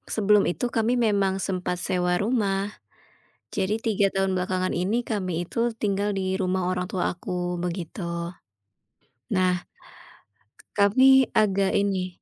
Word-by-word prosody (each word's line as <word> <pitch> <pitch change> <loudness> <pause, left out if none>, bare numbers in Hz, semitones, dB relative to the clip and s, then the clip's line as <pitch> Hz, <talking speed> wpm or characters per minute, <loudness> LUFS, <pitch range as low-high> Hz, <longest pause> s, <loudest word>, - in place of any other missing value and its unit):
sebelum 210 -1 +4
itu, 245 - -3
kami 225 +2 +2
memang 200 -3 +2
sempat 180 -2 -2
sewa 180 -1 +1
rumah. 205 -3 0 0.8
Jadi 190 +2 0
3 205 -3 +2
tahun 195 -1 +1
belakangan 185 0 -1
ini 190 +6 0
kami 195 -4 -1
itu 175 - -11 0.2
tinggal 200 0 0
di 190 - -1 0.2
rumah 185 -1 0
orang 180 0 -1
tua 185 -4 -1
aku 180 0 -4
begitu. 175 +1 -4 1.4
Nah 185 -1 +2 1.2
kami 260 +6 +6
agak 200 -2 +2
ini, 190 -3 -1
195 Hz, 125 wpm, -25 LUFS, 180-205 Hz, 1.4 s, kami